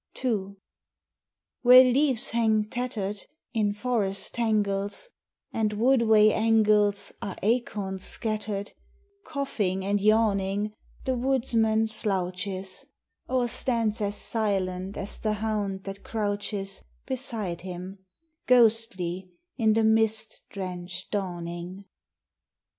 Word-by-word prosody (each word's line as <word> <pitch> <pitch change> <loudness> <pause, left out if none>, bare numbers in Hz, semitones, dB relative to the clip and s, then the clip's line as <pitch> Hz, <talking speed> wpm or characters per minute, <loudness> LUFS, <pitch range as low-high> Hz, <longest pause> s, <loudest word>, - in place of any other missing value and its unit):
II 200 -5 -1 1.1
Where 255 +1 +9
leaves 265 0 +3
hang 220 -2 +2
tattered 215 -5 -3 0.3
In 215 -3 +1
forest 210 -3 -1
tangles, 210 - 0 0.4
And 215 -2 0
woodway 220 -2 +5
angles 215 -2 +3
Are 195 - -5
acorn 205 -4 -1
scattered, 210 0 -3 0.6
Coughing 210 -10 -2
and 200 0 +1
yawning 210 -1 +2 0.3
The 260 - +1
woodsman 230 -4 +2
slouches, 190 -2 -3 0.5
Or 255 -1 +1
stands 230 -2 -1
as 205 0 -1
silent 195 -4 -1
as 200 - -2
the 215 -1 0
hound 205 -3 -2
that 195 0 -7
crouches 205 -2 -3 0.2
Beside 230 -9 -3
him, 185 +1 -8 0.4
ghostly 215 -7 +2 0.3
in 220 -3 +3
the 225 +1 +2
mist 220 0 +1
drenched 180 -1 -6
dawning. 180 -1 -4
210 Hz, 95 wpm, -27 LUFS, 195-225 Hz, 1.1 s, Where